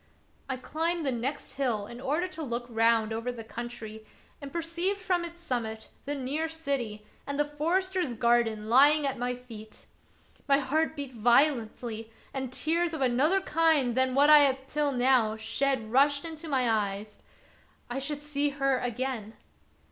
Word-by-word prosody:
I 260 - -2
climbed 325 +5 -2
the 270 - +1
next 255 +4 -3
hill 235 -7 0
in 240 +3 -10
order 300 +7 0
to 330 - -8
look 240 -4 -3
round 225 -1 +2
over 230 +3 -2
the 235 -2 -8
country, 220 -1 -7 0.4
and 280 -1 -8
per 340 - -2
ceived 345 +4 -1
from 370 -3 0
its 340 0 -7
summit 225 -6 -3 0.2
the 290 +1 -2
near 285 +4 -2
city 275 -10 -3 0.2
and 280 0 -3
the 295 - +3
forester's 335 0 -1
garden 225 -2 +1
lying 285 +5 +6
at 270 -3 -2
my 250 0 -1
feet. 225 -4 -12 0.6
My 275 -1 +5
heart 310 +4 0
beat 280 -3 -5
violently 235 -2 +1 0.2
and 265 -2 -4
tears 330 +5 0
of 300 - -5
another 275 +9 +3
kind 315 -8 +2
than 260 0 +1
what 290 +2 +6
I 300 - +10
had 270 -2 +2
till 295 0 0
now 245 -4 +3
shed 225 +1 -1
rushed 280 +3 +3
into 320 -1 -6
my 260 -3 +2
eyes. 210 -1 -1 0.7
I 245 +2 -3
should 290 +1 -3
see 290 -1 0
her 275 -1 0
again 245 -3 -3
265 Hz, 165 wpm, -28 LUFS, 235-300 Hz, 0.7 s, I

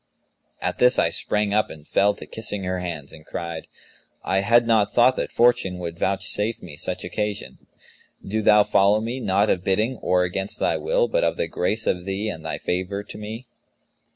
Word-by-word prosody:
At - - -2
this, 125 +1 +5
I - - +3
sprang 105 -1 0
up 105 +1 +2
and 75 -1 -12
fell 100 +1 +2
to - - -9
kissing 105 -3 -3
her 90 0 -2
hands 80 -6 -6
and 75 - -12
cried, 85 0 -6 0.6
'I 95 +2 +1
had 115 +4 +4
not 110 -3 +2
thought 125 +2 +4
that - - -2
Fortune 115 -6 +2
would 85 -2 -6
vouchsafe 100 +3 0
me 85 -5 -9
such 90 +5 -2
occasion. 105 +2 -4 0.7
Do 110 +3 -1
thou 105 0 +6
follow 100 +1 +3
me, 115 +4 -4
not 100 -2 +2
of 90 - -1
bidding 110 +7 +1
or 90 -3 +1
against 95 +2 -2
thy - - +1
will, - - +1
but - - 0
of - - 0
the - - -1
grace 110 +5 -1
of 90 -1 -1
thee 100 +3 -2
and 80 -5 -7
thy - - -3
favour 95 +3 -3
to - - -10
me.' 110 +4 -7
100 Hz, 195 wpm, -23 LUFS, 90-110 Hz, 0.7 s, thou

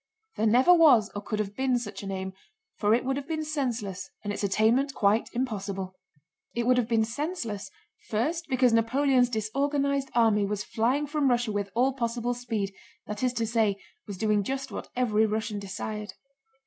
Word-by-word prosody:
There 220 - +1
never 255 +11 +6
was 280 -11 +6
or 205 - -4
could 215 +1 -3
have 205 -1 -3
been 260 -1 +1
such 205 -5 -6
an 200 - -6
aim, 190 0 -4 0.4
for 210 +2 +3
it 245 - -2
would 270 +1 0
have 280 0 -5
been 315 -1 -2
senseless 225 -11 -3
and 205 -1 -2
its 205 - -4
attainment 225 +8 +2
quite 205 +2 +2
impossible. 200 -6 -3 0.6
It 235 0 0
would 250 0 +4
have 240 -3 +1
been 225 -2 +2
senseless, 230 - -4 0.4
first 315 +10 -1
because 255 -2 +3
Napoleon's 250 +2 +3
disorganized 275 +5 0
army 220 -3 +4
was 205 0 -2
flying 250 +6 0
from 290 -2 +1
Russia 240 -2 +1
with 205 -1 -2
all 260 +3 +3
possible 240 -1 -1
speed, 225 -5 -3 0.3
that 210 0 -5
is 255 -1 +2
to 230 -2 -1
say, 220 -3 +1 0.3
was 200 -2 -6
doing 210 0 +2
just 270 +5 -4
what - - -6
every 220 -3 +2
Russian 215 0 -2
desired. 205 +1 -5
230 Hz, 180 wpm, -27 LUFS, 210-260 Hz, 0.6 s, never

